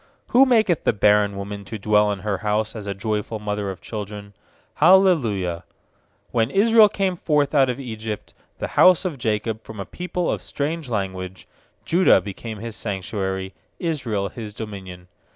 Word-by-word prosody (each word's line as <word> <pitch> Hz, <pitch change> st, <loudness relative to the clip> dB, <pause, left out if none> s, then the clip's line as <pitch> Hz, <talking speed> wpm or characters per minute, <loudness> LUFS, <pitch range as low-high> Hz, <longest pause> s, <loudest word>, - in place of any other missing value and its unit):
Who 265 Hz, +3 st, +6 dB
maketh 220 Hz, -, +3 dB
the -, -, +2 dB
barren 105 Hz, -1 st, +3 dB
woman 100 Hz, +1 st, -6 dB
to 110 Hz, +3 st, -6 dB
dwell 105 Hz, 0 st, +3 dB
in 100 Hz, -2 st, -4 dB
her 105 Hz, -2 st, -2 dB
house 105 Hz, +1 st, -1 dB
As 105 Hz, -2 st, -7 dB
a 100 Hz, -, -3 dB
joyful 105 Hz, +2 st, -2 dB
mother 105 Hz, -1 st, -3 dB
of 95 Hz, -, -7 dB
children. 105 Hz, -1 st, -7 dB, 0.4 s
Hallelujah. 140 Hz, -, +4 dB, 0.7 s
When 115 Hz, -1 st, +1 dB
Israel 220 Hz, +4 st, +6 dB
came 195 Hz, -3 st, -1 dB
forth 150 Hz, -4 st, +1 dB
out 135 Hz, -3 st, +4 dB
of 125 Hz, +1 st, -3 dB
Egypt, 110 Hz, -4 st, -6 dB, 0.2 s
The -, -, -4 dB
house 185 Hz, +1 st, +5 dB
of 160 Hz, -7 st, -3 dB
Jacob 110 Hz, 0 st, -1 dB
from 110 Hz, -2 st, -10 dB
a 100 Hz, -, -4 dB
people 180 Hz, -, -3 dB
of -, -, -3 dB
strange 150 Hz, 0 st, -3 dB
language; 95 Hz, -3 st, -4 dB, 0.4 s
2Judah 175 Hz, -, +5 dB
became 105 Hz, +3 st, -7 dB
His 115 Hz, +1 st, -6 dB
sanctuary, 95 Hz, -1 st, -3 dB, 0.2 s
Israel 120 Hz, -, -2 dB
His 105 Hz, -3 st, -8 dB
dominion. 95 Hz, -5 st, -8 dB
110 Hz, 160 wpm, -22 LUFS, 100-145 Hz, 0.7 s, Who